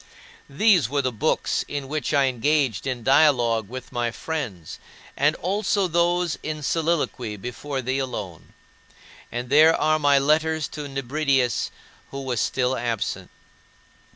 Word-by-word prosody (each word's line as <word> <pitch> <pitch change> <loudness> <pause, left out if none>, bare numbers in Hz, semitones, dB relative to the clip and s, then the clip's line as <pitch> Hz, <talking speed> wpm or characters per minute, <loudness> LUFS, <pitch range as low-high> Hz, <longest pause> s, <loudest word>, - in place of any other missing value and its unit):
These 170 - +3
were 140 0 0
the 130 - 0
books 110 - 0
in 140 -2 -4
which 150 +2 -2
I 140 -2 +3
engaged 130 -3 0
in 125 -3 -3
dialogue 120 -6 +3
with 130 0 -8
my 120 -1 -1
friends, 115 - -5 0.4
and 150 +3 +2
also 200 +1 0
those 175 0 +1
in 155 -1 -5
soliloquy 150 -9 -1
before 130 +5 -5
thee 130 +2 -1
alone. 105 - -6 0.8
And 120 +2 -5
there 155 +3 +6
are 155 0 +2
my 145 -1 +4
letters 155 +2 +1
to 150 -1 -6
Nebridius, 135 -2 0 0.4
who 140 - -6
was 125 -4 -1
still 130 0 0
absent. 115 -3 -3
140 Hz, 135 wpm, -24 LUFS, 120-155 Hz, 0.8 s, there